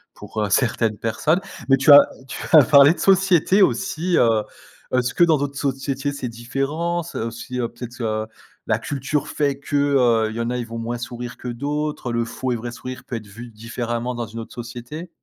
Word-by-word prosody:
pour 110 Hz, -, -5 dB
heu, 105 Hz, -, -1 dB
certaines 115 Hz, -1 st, +1 dB
personnes. 130 Hz, -, +1 dB, 0.3 s
Mais 135 Hz, -, +6 dB
tu 140 Hz, +3 st, +5 dB
as 145 Hz, -, +12 dB, 0.3 s
tu -, -, -7 dB
as 155 Hz, -3 st, +9 dB
parlé 145 Hz, +2 st, +7 dB
de -, -, -13 dB
société 195 Hz, 0 st, +4 dB
aussi, 165 Hz, +4 st, +1 dB
heu, 110 Hz, -2 st, +3 dB, 0.5 s
est-ce 125 Hz, -1 st, +1 dB
ce -, -, -8 dB
que -, -, +4 dB
dans 165 Hz, -3 st, +4 dB
d'autres 140 Hz, 0 st, -3 dB
sociétés 135 Hz, 0 st, -2 dB
c'est 135 Hz, -3 st, -4 dB
différence, 150 Hz, +9 st, -3 dB
aussi 115 Hz, +3 st, -5 dB
heu, 120 Hz, -, 0 dB
peut-être 120 Hz, 0 st, -9 dB
heu, 110 Hz, -1 st, -1 dB, 0.4 s
la -, -, +2 dB
culture 140 Hz, +1 st, -2 dB
fait 140 Hz, -2 st, 0 dB
que 140 Hz, +1 st, -5 dB
heu, 125 Hz, -6 st, +3 dB
il -, -, -8 dB
y -, -, -4 dB
en 115 Hz, -, -1 dB
a, 125 Hz, -, -1 dB
ils 120 Hz, -, -3 dB
vont 115 Hz, 0 st, -7 dB
moins 120 Hz, +1 st, -3 dB
sourire 120 Hz, 0 st, -7 dB
que -, -, -8 dB
d'autres, 145 Hz, +2 st, -3 dB
le 115 Hz, 0 st, 0 dB
faux 125 Hz, +3 st, -4 dB
et -, -, +1 dB
vrai 120 Hz, +1 st, -5 dB
sourire 130 Hz, +1 st, -8 dB
peut 125 Hz, -, -6 dB
être 110 Hz, -2 st, -6 dB
vu 115 Hz, +4 st, -10 dB
différemment 115 Hz, +2 st, -4 dB
dans 120 Hz, 0 st, -3 dB
une 115 Hz, +3 st, -8 dB
autre 115 Hz, -, -9 dB
société? 120 Hz, +8 st, -7 dB
125 Hz, 215 wpm, -22 LUFS, 115-145 Hz, 0.5 s, as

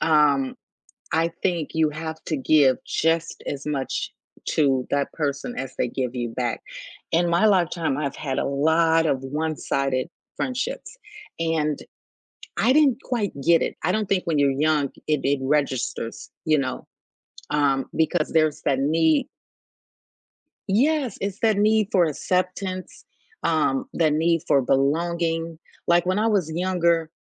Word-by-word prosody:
Um, 145 Hz, -4 st, +3 dB, 0.6 s
I 165 Hz, +1 st, +1 dB
think 175 Hz, -5 st, 0 dB
you 160 Hz, -1 st, +2 dB
have 160 Hz, +1 st, -6 dB
to 155 Hz, -, -1 dB
give 135 Hz, -2 st, +4 dB
just 165 Hz, 0 st, 0 dB
as 140 Hz, -1 st, -4 dB
much 140 Hz, -3 st, -3 dB, 0.4 s
to 135 Hz, -4 st, +2 dB
that 140 Hz, 0 st, 0 dB
person 150 Hz, -, -3 dB
as 135 Hz, -, -5 dB
they 125 Hz, -, +1 dB
give 125 Hz, 0 st, -3 dB
you 120 Hz, -1 st, -2 dB
back. 120 Hz, 0 st, -3 dB, 0.5 s
In 170 Hz, +1 st, +2 dB
my 170 Hz, +5 st, +3 dB
lifetime, 170 Hz, -7 st, +2 dB
I've 140 Hz, -2 st, -2 dB
had 135 Hz, -3 st, -3 dB
a -, -, 0 dB
lot 160 Hz, +3 st, +3 dB
of 135 Hz, -3 st, 0 dB
one-sided 140 Hz, -2 st, -1 dB, 0.3 s
friendships, 265 Hz, -, -3 dB, 0.4 s
and 160 Hz, -3 st, 0 dB, 0.8 s
I 240 Hz, +5 st, +4 dB
didn't 280 Hz, -5 st, +4 dB
quite 230 Hz, -6 st, -2 dB
get 165 Hz, +2 st, +4 dB
it, -, -, -2 dB
I -, -, +1 dB
don't 215 Hz, -2 st, -1 dB
think 190 Hz, -2 st, +1 dB
when 160 Hz, -3 st, +1 dB
you're 140 Hz, -1 st, +4 dB
young, 150 Hz, +1 st, +2 dB, 0.2 s
it 150 Hz, -2 st, +1 dB
it 140 Hz, +1 st, +2 dB
registers, 135 Hz, -4 st, -1 dB
you 155 Hz, -1 st, +3 dB
know? 130 Hz, -2 st, -3 dB, 0.7 s
Um, 140 Hz, -2 st, +2 dB
because 160 Hz, +2 st, +1 dB
there's 155 Hz, -2 st, +2 dB
that 135 Hz, -2 st, +1 dB
need 160 Hz, +2 st, +2 dB, 1.4 s
Yes, 260 Hz, +3 st, +1 dB
it's 200 Hz, 0 st, -3 dB
that 220 Hz, -2 st, +3 dB
need 215 Hz, 0 st, +3 dB
for 180 Hz, -3 st, +5 dB
acceptance, 185 Hz, +4 st, -3 dB, 0.4 s
um, 155 Hz, -5 st, +1 dB
that 155 Hz, -2 st, +2 dB
need 165 Hz, +1 st, +2 dB
for 140 Hz, -, +5 dB
belonging. 165 Hz, +5 st, 0 dB, 0.3 s
Like, 175 Hz, 0 st, +4 dB
when 185 Hz, +2 st, +1 dB
I 220 Hz, -, +2 dB
was 200 Hz, -8 st, +1 dB
younger, 170 Hz, -2 st, +1 dB
160 Hz, 145 wpm, -24 LUFS, 140-175 Hz, 1.4 s, for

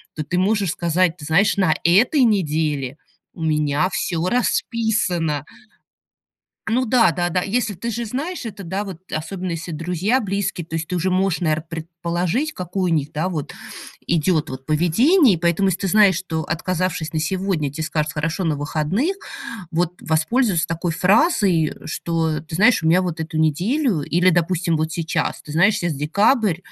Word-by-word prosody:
то 155 Hz, -, -3 dB
ты 180 Hz, +5 st, -2 dB
можешь 200 Hz, -2 st, +1 dB
сказать: 175 Hz, 0 st, +1 dB
"Знаешь, 160 Hz, +7 st, +2 dB
на 185 Hz, -5 st, +3 dB
этой 230 Hz, -, +4 dB
неделе 155 Hz, -, 0 dB, 0.4 s
у 165 Hz, -, -7 dB
меня 150 Hz, +1 st, +1 dB
всё 175 Hz, -3 st, -1 dB
расписано". 195 Hz, -, 0 dB, 1.2 s
Ну 245 Hz, +3 st, +1 dB
да, 235 Hz, -1 st, +4 dB
да-да, 175 Hz, 0 st, -1 dB
если, 220 Hz, +1 st, -1 dB
ты 235 Hz, +6 st, -4 dB
же 235 Hz, +1 st, -3 dB
знаешь, 275 Hz, +9 st, -4 dB
это, 210 Hz, -3 st, -7 dB
да, 190 Hz, +4 st, -3 dB
вот 190 Hz, -5 st, -8 dB
особенно 180 Hz, +4 st, -4 dB
если 165 Hz, +1 st, -5 dB
друзья, 180 Hz, -, 0 dB
близкие, 200 Hz, -4 st, -2 dB
то 165 Hz, -, -8 dB
есть 160 Hz, 0 st, -3 dB
ты -, -, -3 dB
уже 180 Hz, +2 st, 0 dB
можешь, 185 Hz, -1 st, +1 dB
наверно, 155 Hz, -2 st, 0 dB
предположить, 170 Hz, -, -2 dB
какое 180 Hz, 0 st, -2 dB
у -, -, +4 dB
них, 150 Hz, -1 st, -1 dB
да, 160 Hz, +5 st, -1 dB
вот 155 Hz, -6 st, -4 dB, 0.5 s
идет 165 Hz, -1 st, +1 dB
вот 130 Hz, 0 st, -8 dB
поведение. 210 Hz, -, +4 dB
И -, -, -1 dB
поэтому, 170 Hz, +3 st, +1 dB
если 185 Hz, 0 st, -1 dB
ты 195 Hz, -, 0 dB
знаешь, 200 Hz, -2 st, +5 dB
что, 160 Hz, -3 st, -3 dB
отказавшись 170 Hz, 0 st, -2 dB
на 160 Hz, -, -1 dB
сегодня, 165 Hz, -3 st, -1 dB
те 160 Hz, +2 st, -4 dB
скажут: 155 Hz, 0 st, -1 dB
"Хорошо, 165 Hz, +4 st, -2 dB
на 155 Hz, -3 st, 0 dB
выходных", 160 Hz, -, -1 dB, 0.5 s
вот 175 Hz, +1 st, 0 dB
воспользоваться 175 Hz, +3 st, +1 dB
такой 165 Hz, +1 st, -2 dB
фразой: 190 Hz, -, +3 dB
"Что, 160 Hz, -2 st, -1 dB
ты 155 Hz, +1 st, -10 dB
знаешь, 215 Hz, 0 st, +4 dB
у -, -, -1 dB
меня 180 Hz, +3 st, +4 dB
вот 175 Hz, -3 st, -3 dB
эту 160 Hz, 0 st, -3 dB
неделю" 185 Hz, -, +1 dB
Или, 175 Hz, +5 st, +3 dB
допустим, 170 Hz, -1 st, +1 dB
вот 155 Hz, +1 st, -1 dB
сейчас: 165 Hz, -1 st, -2 dB
"Ты 150 Hz, -, -9 dB
знаешь, 180 Hz, +7 st, +4 dB
сейчас 170 Hz, -3 st, -1 dB
декабрь, 200 Hz, -, +2 dB
175 Hz, 170 wpm, -21 LUFS, 160-200 Hz, 1.2 s, знаешь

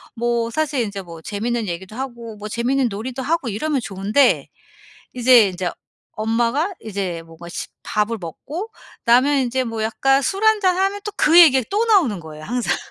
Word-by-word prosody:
뭐 235 Hz, 0 st, -1 dB
사실 300 Hz, -1 st, 0 dB
인제 200 Hz, -3 st, -4 dB
뭐 170 Hz, -3 st, -11 dB
재밌는 225 Hz, +3 st, -2 dB
얘기도 185 Hz, +4 st, -6 dB
하고 235 Hz, -3 st, -6 dB
뭐 210 Hz, +1 st, -7 dB
재밌는 250 Hz, +4 st, +1 dB
놀이도 245 Hz, +6 st, -5 dB
하고 315 Hz, -4 st, -1 dB
이러면 270 Hz, +7 st, -1 dB
좋은데 210 Hz, +6 st, +1 dB, 0.7 s
이제 245 Hz, -3 st, +6 dB
인제 180 Hz, -1 st, -3 dB, 0.4 s
엄마가 235 Hz, -, 0 dB
이제 190 Hz, -6 st, -4 dB
뭔가 165 Hz, +1 st, -12 dB
십 -, -, -6 dB
밥을 210 Hz, +2 st, -1 dB
먹고 290 Hz, -, -6 dB, 0.4 s
나면 260 Hz, +5 st, +4 dB
인제 260 Hz, 0 st, 0 dB
뭐 225 Hz, -2 st, -4 dB
약간 270 Hz, +5 st, +2 dB
술 385 Hz, -, -2 dB
1 440 Hz, -1 st, +5 dB
잔하면 385 Hz, +2 st, +1 dB
또 420 Hz, -, -4 dB
그 330 Hz, +3 st, +6 dB
얘기가 265 Hz, -8 st, +7 dB
또 425 Hz, +3 st, +1 dB
나오는 350 Hz, -, +3 dB
거예요 155 Hz, -2 st, -10 dB
항상. 245 Hz, +7 st, -1 dB
235 Hz, 325 characters per minute, -21 LUFS, 205-280 Hz, 0.7 s, 얘기가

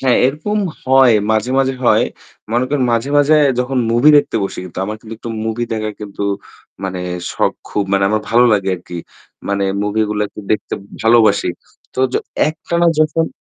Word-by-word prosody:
হ্যাঁ, 130 Hz, -2 st, +3 dB
এরকম 155 Hz, +11 st, -2 dB, 0.3 s
হয়। 130 Hz, -1 st, +5 dB, 0.2 s
মাঝে, 110 Hz, +3 st, +1 dB
মাঝে 135 Hz, -1 st, +1 dB
হয়। -, -, +4 dB, 0.5 s
মনে 120 Hz, +2 st, +2 dB
করেন 140 Hz, -1 st, 0 dB
মাঝে, 115 Hz, +3 st, 0 dB
মাঝে 145 Hz, +2 st, +4 dB, 0.2 s
যখন 125 Hz, +1 st, 0 dB
movie 120 Hz, +6 st, +5 dB
দেখতে 145 Hz, -, +2 dB
বসি -, -, -6 dB
কিন্তু 90 Hz, -, -9 dB
আমার 105 Hz, +2 st, -4 dB
কিন্তু 115 Hz, 0 st, -9 dB
একটু 115 Hz, -, -7 dB
movie 110 Hz, +2 st, -2 dB
দেখা 110 Hz, -1 st, -2 dB
কিন্তু 100 Hz, -1 st, -6 dB, 0.6 s
মানে 95 Hz, -1 st, -3 dB, 0.3 s
শখ -, -, +1 dB, 0.2 s
খুব 105 Hz, -, -1 dB
মানে 95 Hz, 0 st, +3 dB
আমার 110 Hz, 0 st, +1 dB
ভালো 120 Hz, +2 st, +5 dB
লাগে 95 Hz, -2 st, +1 dB
আরকি। 90 Hz, 0 st, -10 dB, 0.5 s
মানে 100 Hz, 0 st, 0 dB, 0.2 s
movie 105 Hz, +1 st, 0 dB
গুলা 105 Hz, 0 st, 0 dB
কিন্তু 105 Hz, -2 st, -10 dB
দেখতে 105 Hz, -, -2 dB, 0.3 s
ভালোবাসি। 115 Hz, -3 st, +4 dB, 0.5 s
তো -, -, -9 dB
য -, -, -6 dB, 0.3 s
একটানা 170 Hz, +2 st, -1 dB
যখন 155 Hz, +1 st, +2 dB
115 Hz, 175 wpm, -17 LUFS, 105-135 Hz, 0.6 s, হয়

